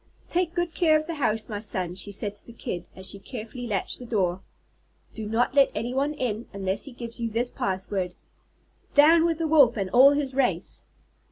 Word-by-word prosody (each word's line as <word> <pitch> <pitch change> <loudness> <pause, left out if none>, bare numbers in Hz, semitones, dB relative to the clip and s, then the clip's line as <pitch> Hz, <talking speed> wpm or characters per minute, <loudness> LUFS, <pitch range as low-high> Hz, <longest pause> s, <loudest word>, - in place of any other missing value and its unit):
"Take 350 -1 0
good 345 -2 -1
care 315 -3 +4
of 310 - -3
the 335 - -3
house, 225 -7 0
my 210 -3 -4
son," 185 -4 -1
she 195 +2 -5
said 205 0 -2
to 205 - -14
the 235 - -13
Kid, 175 -6 -5
as 190 0 -4
she 200 - -4
carefully 240 +3 -7
latched 200 -4 -2
the 250 - -8
door. 190 -5 0 0.7
"Do 220 -2 -5
not 230 +4 +1
let 275 -1 +5
anyone 260 +7 -1
in, 235 -4 -3
unless 195 0 -2
he 280 - -9
gives 235 -1 -8
you 230 -1 -1
this 235 +3 -1
password: 190 -1 -2 0.8
'Down 320 +3 +7
with 330 -2 +1
the 325 -1 -1
Wolf 280 -7 +5
and 195 -2 -2
all 260 +3 +8
his 285 -2 0
race!'" 265 -1 -1
235 Hz, 200 wpm, -26 LUFS, 205-285 Hz, 0.8 s, all